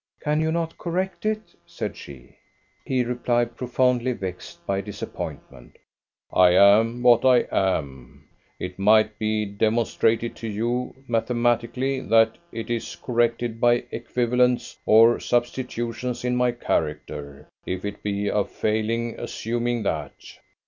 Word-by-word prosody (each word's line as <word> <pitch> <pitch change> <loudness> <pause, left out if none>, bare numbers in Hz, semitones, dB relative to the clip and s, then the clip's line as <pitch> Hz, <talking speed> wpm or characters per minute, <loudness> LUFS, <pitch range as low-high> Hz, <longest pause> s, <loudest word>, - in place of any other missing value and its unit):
"Can 150 0 0
you 160 0 +1
not 165 0 -3
correct 185 +4 -2
it?" 215 0 -3
said - - -5
she. 65 -4 -12 0.5
He 130 -1 +1
replied, 120 -1 0
profoundly 125 0 +1
vexed 90 -4 -7
by 100 0 -1
disappointment: 95 - -8 0.6
"I 90 -1 +6
am 110 +5 +5
what 120 -1 +6
I 130 -2 +5
am. 70 -9 -2 0.3
It 90 +1 -6
might 110 +1 +4
be 110 -1 0
demonstrated 110 +2 0
to 115 - -6
you 120 +4 -2
mathematically 120 +2 0
that 115 -2 +3
it 115 +1 -5
is 115 -7 -3
corrected 115 +2 -1
by 120 0 +4
equivalents 125 0 0
or 115 +2 +6
substitutions 120 0 -2
in 125 0 +1
my 125 0 +2
character. 75 - -3 0.2
If 95 +1 -3
it 105 0 -5
be 100 0 -2
a 105 0 +1
failing 115 +3 -2
assuming 120 0 -2
that." 75 -7 -2
115 Hz, 125 wpm, -24 LUFS, 105-125 Hz, 0.6 s, I